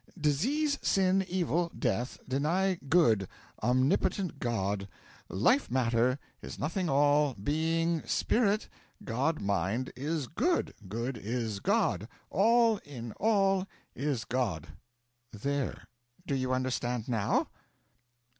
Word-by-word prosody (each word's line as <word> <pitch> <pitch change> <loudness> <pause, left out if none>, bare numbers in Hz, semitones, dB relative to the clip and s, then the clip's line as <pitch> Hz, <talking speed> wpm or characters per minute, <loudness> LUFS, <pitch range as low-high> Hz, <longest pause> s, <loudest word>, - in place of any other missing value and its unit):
Disease 270 - +1
sin 190 0 +3
evil 175 -2 0
death 120 0 -1
deny 165 +9 +1 0.2
Good 115 - +4 0.3
omnipotent 140 - +1
God 100 -5 -1 0.4
life 180 - +2
matter 125 0 +2 0.2
is - - -8
nothing 170 +4 -1
all 145 0 +3
being 160 +8 0
Spirit 215 -2 +1 0.4
God 140 +7 0
Mind 100 +5 -1
is 150 +3 -2
Good 335 - 0
good 115 +5 -3
is 110 -1 -3
God 190 - +1 0.2
all 230 +3 +4
in 120 - -8
All 195 -3 +2 0.3
is 135 -4 -2
God. 105 -11 -2 0.6
There 140 +5 -2 0.4
do 145 - -2
you 130 -1 0
understand 125 -2 -1
now? 110 -5 +1
140 Hz, 105 wpm, -30 LUFS, 120-180 Hz, 0.6 s, Good